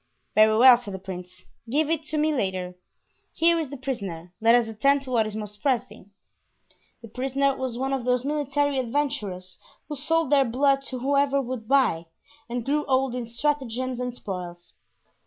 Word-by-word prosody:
"Very 215 +1 +5
well," 250 +1 +8
said 205 -5 -8
the - - -4
prince; 180 -1 -9 0.3
"give 295 +5 +1
it 325 -1 0
to 305 - -3
me 305 +1 +2
later. 190 -7 -2 0.6
Here 335 0 +3
is 310 -4 -3
the 280 - -7
prisoner; 195 -10 -5
let 230 +1 +6
us 240 -2 +3
attend 275 +6 +2
to 260 - -8
what 225 -3 +2
is 215 - -6
most 210 -1 -7
pressing." 250 -7 -2 0.9
The - - -8
prisoner 270 +4 0
was 260 -3 -4
one 270 +2 -1
of 265 -2 -1
those 250 +1 +1
military 285 -1 0
adventurers 230 -9 -3 0.3
who 300 - -3
sold 310 +1 0
their 280 -2 +5
blood 275 +3 +2
to 255 - -5
whoever 280 +2 +2
would 250 -4 -5
buy, 240 -12 +2 0.4
and 240 -1 -3
grew 295 +2 +1
old 265 -1 +1
in 245 -2 -4
stratagems 255 -1 -2
and 250 -1 -3
spoils. 180 -5 -7
255 Hz, 175 wpm, -25 LUFS, 215-280 Hz, 0.9 s, well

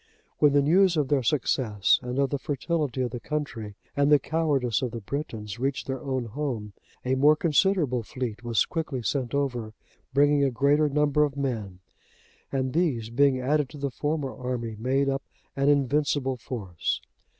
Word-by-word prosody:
When 145 -2 +5
the 145 -1 +4
news 175 +3 +4
of 145 -3 +1
their 145 -3 +3
success 120 -6 +2
and 125 +1 -4
of 140 -1 +1
the 140 - -1
fertility 145 -2 -2
of 125 - -2
the 120 - -5
country, 115 -7 -4 0.2
and 140 +1 +3
the 150 - +8
cowardice 140 -6 0
of 130 - -1
the 115 - -6
Britons, 110 -3 -5
reached 135 +1 -1
their 135 +1 -4
own 130 -4 -2
home, 115 -4 -4 0.3
a 130 - +1
more 145 +3 +5
considerable 155 -5 +2
fleet 120 0 -5
was 115 -2 +2
quickly 155 -7 -3
sent 125 +4 -1
over, 125 -6 -2 0.4
bringing 145 +1 +4
a 140 - +3
greater 145 +4 +3
number 150 +1 +2
of 145 -2 -2
men, 110 -9 -3 0.7
and 130 -1 -1
these, 135 -10 0
being 135 +1 +3
added 140 +2 +1
to 150 - -11
the 140 -1 -3
former 145 -1 -2
army, 125 -3 -4
made 135 +4 +1
up 135 0 0 0.3
an 140 +1 +2
invincible 140 -1 +1
force. 105 -8 -3
135 Hz, 170 wpm, -26 LUFS, 120-145 Hz, 0.7 s, the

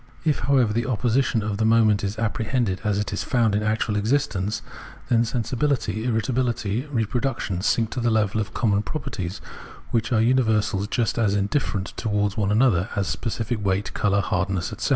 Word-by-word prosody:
If, 155 -2 +2
however, 125 -4 +2
the 120 +3 -1
opposition 120 -1 +1
of 105 -1 -2
the 110 - 0
moments 110 -2 +4
is 100 +1 -2
appre 110 0 -2
hended 115 -8 0
as 105 -2 +1
it 105 0 -2
is 100 - -2
found 115 -4 +2
in 105 - +1
actual 110 0 0
existence, 105 -2 0 0.5
then 115 -2 +4
sensibihty, 120 0 -1
irritability, 120 0 -1
reproduction 120 -6 -1
sink 110 +2 +1
to - - -3
the 120 0 +1
level 110 -1 +1
of 105 +1 -5
common 105 -4 +1
properties, 100 - -5 0.5
which 115 +2 0
are 115 - +3
imiversals 110 -4 +2
just 120 -1 0
as 105 -3 +2
indifferent 100 -1 -1
to 115 - -2
wards 105 -1 0
one 105 -3 0
another 105 -4 +3
as 100 - 0
specific 115 -1 -3
weight, 95 +1 -1
colour, 100 -1 +2
hardness, 90 +2 -1
etc. 120 +6 -3
110 Hz, 175 wpm, -24 LUFS, 100-120 Hz, 0.5 s, moments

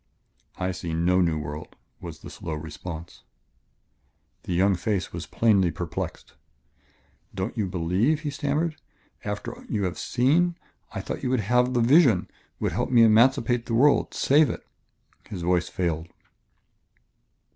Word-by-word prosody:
"I 95 0 -1
see 85 -3 -4
no 90 +3 +3
new 85 -3 +1
world," 75 +1 -7 0.2
was - - -9
the - - -9
slow 80 - -5
response. 80 +2 -8 1.2
The 90 - -4
young 95 +3 +4
face 95 +1 -2
was 85 -1 -6
plainly 100 -6 +3
perplexed. - - -5 1.0
"Don't 95 +3 -3
you 105 -5 -1
believe?" 95 - +1
he 150 -2 -3
stammered. 150 +3 -1 0.5
"After - - -4
you 105 - -1
have 90 -2 -2
seen... 165 +8 +2 0.3
I - - -4
thought - - -5
you 125 - -1
would 130 -3 +1
have 125 +4 +2
the 120 - +3
vision, 125 - +4 0.3
would - - 0
help - - -1
me 120 -2 +6
emancipate 115 +1 +4
the 115 - -1
world, 140 +4 +3
save 145 0 +4
it - - -6 0.3
" - - -29
His 90 -4 -5
voice 90 0 +1
failed. 85 -3 -2
100 Hz, 145 wpm, -25 LUFS, 85-125 Hz, 1.2 s, me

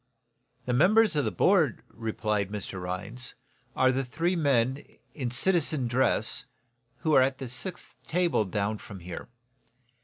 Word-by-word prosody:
"The 125 - -1
members 200 - +5
of 145 - +2
the - - 0
board," - - +3
replied 105 -3 -2
Mr. 100 -2 -5
Rhinds, 95 +8 -5 0.4
"are 130 0 +4
the 135 +1 0
three 165 +8 -1
men, 135 -4 +1 0.3
in 130 -5 -3
citizen 150 0 +2
dress, 125 +3 0 0.6
who 155 - +1
are 135 - +7
at 130 0 +1
the 135 - -5
sixth 175 +9 -4
table 170 -9 +2
down 105 +2 -2
from 95 -3 -10
here. 85 0 -7
130 Hz, 145 wpm, -28 LUFS, 105-155 Hz, 0.6 s, are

